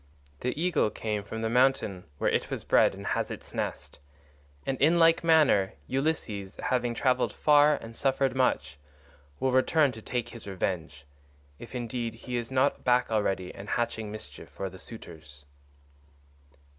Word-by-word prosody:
The 125 +4 -2
eagle 170 -9 +2
came 105 0 -3
from 110 +3 -6
the - - +1
mountain 125 -7 +2
where - - +1
it - - 0
was - - -4
bred - - +4
and - - -9
has - - -1
its - - -8
nest, - - -4 0.7
and 135 -1 -2
in 160 +4 +5
like 165 0 +5
manner 155 -12 +4
Ulysses, 120 - -2
after - - -3
having 120 -1 0
travelled 130 0 +2
far 150 0 +5
and 115 -4 -9
suffered 135 0 +1
much, 130 - 0 0.6
will 130 - +1
return 135 +3 +3
to 110 -2 -10
take 120 +1 -3
his 115 -3 -10
revenge—if 70 - -6
indeed 120 -1 -3
he 125 +2 -6
is 120 -1 -2
not 130 +2 +1
back 125 -1 +2
already 95 -4 0
and 100 +2 -9
hatching 110 -3 -1
mischief 75 -10 -8
for 95 -1 -5
the 95 - -12
suitors." 75 - -10
115 Hz, 155 wpm, -28 LUFS, 95-130 Hz, 0.7 s, in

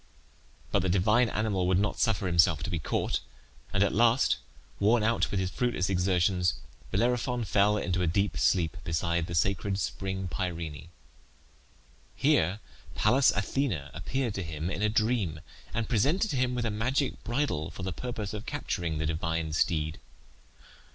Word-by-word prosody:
But - - +2
the 95 - 0
divine 105 +6 +3
animal 100 -4 0
would 90 -1 +3
not 105 +2 0
suffer 110 -4 +1
himself 85 -3 +3
to 95 - -3
be 85 - -1
caught, - - -1 0.5
and 95 +1 +3
at 100 - +1
last, 120 +3 +4 0.4
worn 110 +3 +3
out 115 +1 +1
with 100 - -1
his 95 0 -1
fruitless 110 -4 0
exertions, 90 0 +2 0.3
Bellerophon 120 - 0
fell 105 +1 +3
into 90 -3 -1
a 90 - +1
deep 100 +5 +1
sleep 90 -1 +1
beside 85 0 -1
the 85 - -4
sacred 95 +3 +1
spring 95 -1 -3
Pirene. 85 -4 -4 1.3
Here 90 +7 +2 0.3
Pallas 125 +6 +4
Athene 110 - 0
appeared 120 +7 -2
to 100 - -3
him 80 0 -4
in 100 - -3
a 105 - +3
dream, 110 -7 0 0.3
and 115 -2 -2
presented 145 - +2
him 125 -2 0
with 120 -1 -1
a 115 - 0
magic 125 +6 -1
bridle 120 - -1
for 85 +3 -8
the 95 -1 -2
purpose 110 -1 -5
of 105 +1 -6
capturing 85 - -2
the 80 - -1
divine 80 0 -2
steed. 80 0 0
95 Hz, 160 wpm, -29 LUFS, 85-115 Hz, 1.3 s, last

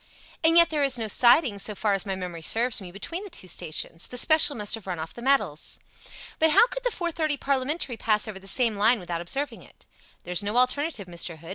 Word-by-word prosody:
"And 330 +1 +4
yet 340 -1 +7
there 300 -2 -1
is 275 -2 +2
no 225 -2 -3
siding, 240 0 +4
so 210 +1 -4
far 210 0 0
as 195 +1 +1
my 195 - -2
memory 180 -3 -7
serves 230 +7 +2
me, 180 -2 -10
between 330 - -6
the 410 - -9
two 345 - -9
stations. 165 -1 -5
The 250 - -6
special 315 +2 +6
must 210 -2 -2
have 225 -4 -4
run 180 -2 -4
off 160 0 -7
the 240 - -10
metals." 260 - -1 0.6
"But 320 - +4
how 310 - +5
could - - -7
the - - +1
four 350 -6 -4
fifty 310 -3 -2
parliamentary 275 -1 -2
pass 215 -1 0
over 205 -3 -7
the 195 - -12
same 230 0 +1
line 225 +3 +3
without 175 -2 -5
observing 275 +12 -3
it?" - - -19 0.4
"There's 180 +2 0
no 205 +3 -2
alternative, 255 - +1
Mr. 170 -1 -4
Hood. 165 +2 -13
230 Hz, 235 wpm, -25 LUFS, 190-290 Hz, 0.6 s, yet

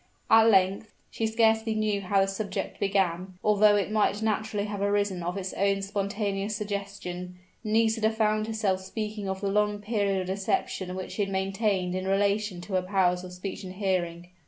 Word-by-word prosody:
At 225 0 +7
length 195 +1 +2 0.2
she 225 - -1
scarcely 220 0 +2
knew 215 -2 0
how 195 +1 +2
the 195 - +2
subject 195 +1 -4
began, 185 -2 0
although 210 0 +5
it 205 0 0
might 215 0 +1
naturally 215 -1 -1
have 205 -1 -4
arisen 200 -2 +1
of 175 +3 -3
its 190 -1 -4
own 195 0 +1
spontaneous 200 +1 -2
suggestion 200 -3 -5 0.3
Nisida 220 0 +2
found 215 -1 +1
herself 210 -4 0
speaking 210 +1 -4
of 190 0 -3
the 200 - 0
long 210 +1 +1
period 205 -2 0
of - - -4
deception 190 -1 -2
which 185 -1 -5
she - - -3
had 195 -1 -1
maintained 195 -1 0
in 185 +1 -3
relation 200 -1 +1
to 190 +3 -8
her 185 - +3
powers 180 -1 +1
of 180 - -8
speech 185 +2 -6
and 185 -1 -7
hearing. 180 -3 -2
200 Hz, 180 wpm, -27 LUFS, 190-215 Hz, 0.3 s, At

